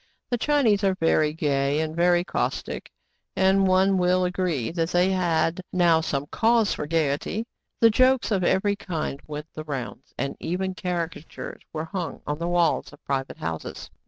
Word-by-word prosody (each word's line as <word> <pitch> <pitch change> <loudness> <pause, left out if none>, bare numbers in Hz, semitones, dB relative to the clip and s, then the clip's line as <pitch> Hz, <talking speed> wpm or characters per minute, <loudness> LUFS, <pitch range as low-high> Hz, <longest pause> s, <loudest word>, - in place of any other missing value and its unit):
The 245 - +2
Chinese 240 -9 +3
are 190 -1 +3
very 160 -3 +2
gay 145 -2 0
and 160 0 -2
very 175 +1 +3
caustic, - - -3 0.5
and 190 0 +4
one 190 +1 +4
will 180 +1 +3
agree 180 -9 -1
that 165 -1 -1
they 180 +2 +3
had 175 -1 +1
now 170 -3 +4
some 145 -3 -2
cause 225 -2 +3
for 150 - -4
gayety; 160 +7 0 0.4
and 225 -1 +7
jokes 255 0 +3
of 190 -3 +1
every 200 +3 +2
kind 165 -8 -4
went 150 +1 -7
the 155 - -6
rounds, 135 -3 -6
and 140 - -2
even 185 +2 -2
caricatures 170 -3 -5
were 155 0 -4
hung 170 -4 -5
on 150 +1 -3
the 170 - -2
walls 175 -1 +1
of 145 - -18
private 135 -1 -2
houses. 80 0 -5
175 Hz, 165 wpm, -25 LUFS, 155-190 Hz, 0.5 s, and